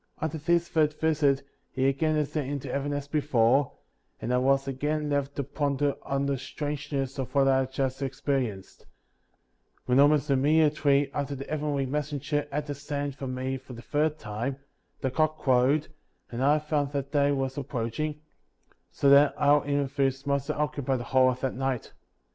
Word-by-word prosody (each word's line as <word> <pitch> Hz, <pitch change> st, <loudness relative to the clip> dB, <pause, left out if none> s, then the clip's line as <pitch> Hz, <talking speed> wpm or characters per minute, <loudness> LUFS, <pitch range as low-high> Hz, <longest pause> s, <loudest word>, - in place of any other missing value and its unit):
47. -, -, -1 dB
After 160 Hz, +4 st, -2 dB
this 170 Hz, 0 st, +3 dB
third 155 Hz, -2 st, +2 dB
visit, 145 Hz, -4 st, +2 dB, 0.3 s
he 130 Hz, 0 st, 0 dB
again 155 Hz, +3 st, +1 dB
ascended 150 Hz, -2 st, -1 dB
into 140 Hz, -1 st, -4 dB
heaven 140 Hz, +1 st, -2 dB
as 145 Hz, -1 st, -3 dB
before, 140 Hz, -3 st, +2 dB, 0.5 s
and 120 Hz, -, -2 dB
I 125 Hz, -, +3 dB
was 135 Hz, +1 st, +2 dB
again 150 Hz, +3 st, -2 dB
left 140 Hz, 0 st, -1 dB
to 140 Hz, -, -1 dB
ponder 140 Hz, 0 st, 0 dB
on 140 Hz, 0 st, -1 dB
the 140 Hz, -2 st, -1 dB
strangeness 140 Hz, -1 st, -4 dB
of 135 Hz, +2 st, -5 dB
what 135 Hz, -1 st, +4 dB
I 135 Hz, 0 st, +4 dB
had 130 Hz, 0 st, -2 dB
just 135 Hz, 0 st, -2 dB
experienced; 130 Hz, -7 st, -3 dB, 1.0 s
"when 125 Hz, +1 st, +3 dB
almost 145 Hz, 0 st, +4 dB
immediately 145 Hz, 0 st, +3 dB
after 140 Hz, 0 st, -2 dB
the 135 Hz, +1 st, -6 dB
heavenly 145 Hz, -2 st, -1 dB
mes 150 Hz, +3 st, -2 dB
^ 145 Hz, -, -2 dB
senger 145 Hz, +1 st, -2 dB
had 145 Hz, +1 st, -2 dB
ascended 145 Hz, -1 st, -4 dB
from 135 Hz, -2 st, -5 dB
me 130 Hz, +1 st, -2 dB
for 130 Hz, 0 st, -12 dB
the 120 Hz, 0 st, -10 dB
third 150 Hz, +4 st, 0 dB
time, 120 Hz, +3 st, -4 dB, 0.4 s
the 130 Hz, -, -1 dB
cock 155 Hz, +2 st, +1 dB
crowed, 135 Hz, +3 st, +2 dB, 0.4 s
and 120 Hz, +2 st, -2 dB
I 145 Hz, +2 st, +5 dB
found 150 Hz, -2 st, -1 dB
that 140 Hz, -1 st, -3 dB
day 145 Hz, -2 st, +3 dB
was 135 Hz, -1 st, -1 dB
approaching, 145 Hz, +2 st, -3 dB, 0.7 s
so 140 Hz, -, 0 dB
that 140 Hz, +1 st, +6 dB
our 145 Hz, 0 st, +4 dB
interviews 135 Hz, -1 st, 0 dB
must 140 Hz, -2 st, 0 dB
have -, -, -2 dB
occupied* 140 Hz, -3 st, -1 dB
the -, -, -4 dB
whole 130 Hz, -1 st, +6 dB
of 125 Hz, 0 st, -3 dB
that 130 Hz, -, -1 dB
night. 135 Hz, -2 st, -3 dB
140 Hz, 180 wpm, -27 LUFS, 135-145 Hz, 1.0 s, that